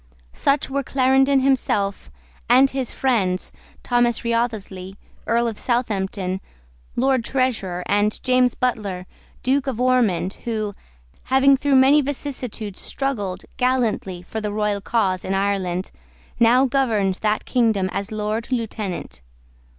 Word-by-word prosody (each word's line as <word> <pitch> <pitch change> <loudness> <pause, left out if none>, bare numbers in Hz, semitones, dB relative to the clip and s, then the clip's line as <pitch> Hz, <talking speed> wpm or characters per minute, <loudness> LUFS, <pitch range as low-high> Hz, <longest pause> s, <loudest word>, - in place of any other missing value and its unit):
Such 275 +1 +1
were 280 +1 -1
Clarendon 270 +1 +3
himself, 230 -7 0 0.4
and 260 +3 +6
his 265 -3 -2
friends, 195 -9 0 0.3
Thomas 240 -1 +1
Wriothesley, 220 -5 -2 0.3
Earl 235 +1 +2
of 225 -2 -4
Southampton, 195 -6 -1 0.5
Lord 260 -1 +2
Treasurer, 225 -10 -1
and 205 +1 +1
James 255 -1 +3
Butler, 205 -7 -2 0.4
Duke 275 +2 +1
of 250 -4 -2
Ormond, 235 -8 +1
who, 215 -3 -2 0.5
having 265 +1 +5
through 275 +1 +1
many 270 +3 +6
vicissitudes 255 -7 -5
struggled 215 -10 -3
gallantly 235 -8 0
for 220 +5 -5
the 210 -1 -3
royal 210 -1 -1
cause 195 -5 0
in 195 - -1
Ireland, 195 -2 -1 0.5
now 245 +3 +5
governed 225 -8 +1
that 215 0 0
kingdom 220 -6 +2
as 200 +2 -3
Lord 215 +3 -3
Lieutenant. 210 - -4
230 Hz, 120 wpm, -22 LUFS, 200-260 Hz, 0.5 s, and